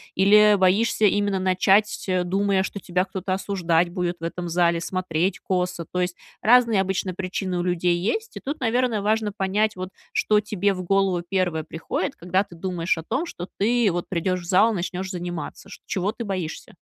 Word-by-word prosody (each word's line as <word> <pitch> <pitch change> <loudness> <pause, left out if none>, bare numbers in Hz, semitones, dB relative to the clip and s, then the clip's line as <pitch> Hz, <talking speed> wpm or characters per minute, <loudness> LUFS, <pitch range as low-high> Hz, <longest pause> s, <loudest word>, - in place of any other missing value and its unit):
или 210 +2 +6
боишься 200 +4 +3
именно 205 -1 +2
начать, 190 +2 +2
думая, 195 +1 +1
что 200 - -5
тебя 180 -1 -1
кто-то 190 0 -3
осуждать 175 -3 +1
будет 175 -1 -2
в - - -13
этом 175 +1 -4
зале, 170 0 +2
смотреть 185 0 -1
косо? 180 -2 -2
То 180 +3 -3
есть, 180 0 -1 0.3
разные 230 -3 +5
обычно 190 -1 -2
причины 185 0 -3
у - - +1
людей 175 0 +1
есть. 430 - -2
И - - -4
тут, 290 +3 -5
наверное, 240 -3 +1
важно 215 0 +1
понять, 205 +2 0
вот, 185 0 -5 0.2
что 210 -1 +3
тебе 205 -1 0
в 185 - -5
голову 190 -1 +1
первое 180 -5 0
приходит, 160 +1 -4
когда 185 +3 0
ты 175 - -14
думаешь 170 -1 -1
о 160 - -5
том, 270 - -2
что 175 - -7
ты 230 +2 +3
вот 175 0 -3
придешь 185 +1 -1
в - - -11
зал 190 +6 +4
и - - -2
начнешь 185 +1 -3
заниматься. 175 -2 -6
Шт - - -11
чего 195 +2 -1
ты 240 - -6
боишься? 185 -6 -5
185 Hz, 190 wpm, -24 LUFS, 175-205 Hz, 0.3 s, или